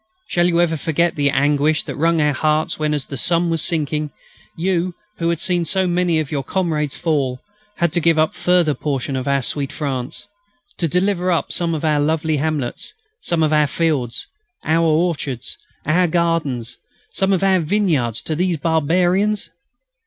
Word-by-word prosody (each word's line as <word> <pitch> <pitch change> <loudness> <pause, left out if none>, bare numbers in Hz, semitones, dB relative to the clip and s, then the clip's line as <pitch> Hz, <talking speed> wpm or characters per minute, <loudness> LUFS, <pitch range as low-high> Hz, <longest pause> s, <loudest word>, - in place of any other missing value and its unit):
Shall 175 -4 +1
you 170 -1 +2
ever 165 -2 +2
forget 165 +3 0
the 145 -1 +2
anguish 145 +2 +2
that - - -6
wrung 165 +2 +2
your 150 -2 +2
hearts 155 +3 0
when, 155 0 0
as 145 -3 -1
the 140 - -6
sun 170 +5 +2
was 165 -2 +1
sinking, 150 -2 -1 0.5
you, 180 0 0 0.2
who 170 0 +1
had 170 -2 0
seen 175 0 +1
so 190 +3 +1
many 175 -2 +1
of 155 -3 -3
your 145 -2 -1
comrades 150 -2 -1
fall, 140 -6 -1 0.4
had 170 -2 0
to - - +2
give 165 -1 +3
up 155 0 +3
a - - -28
further 180 -4 +2
portion 135 -1 -3
of 130 0 -3
our 140 -1 +1
sweet 140 +2 -1
France; 135 -5 -4 0.5
to 170 - +1
deliver 180 +2 +1
up 170 - 0
some 170 -2 0
of 155 - -3
our 150 -1 +2
lovely 155 +1 +1
hamlets, 145 -4 -3 0.3
some 170 -2 0
of 155 0 +2
our 150 -1 +4
fields, 145 -7 -1 0.4
our 165 +1 +2
orchards, 155 -6 -1 0.3
our 175 +4 +3
gardens, 160 -8 -1 0.3
some 195 0 0
of 190 -1 +1
our 190 -1 +4
vineyards, 155 - 0
to 155 - -2
the 180 +1 +1
barbarians?... 175 +6 +1
160 Hz, 180 wpm, -20 LUFS, 145-175 Hz, 0.5 s, our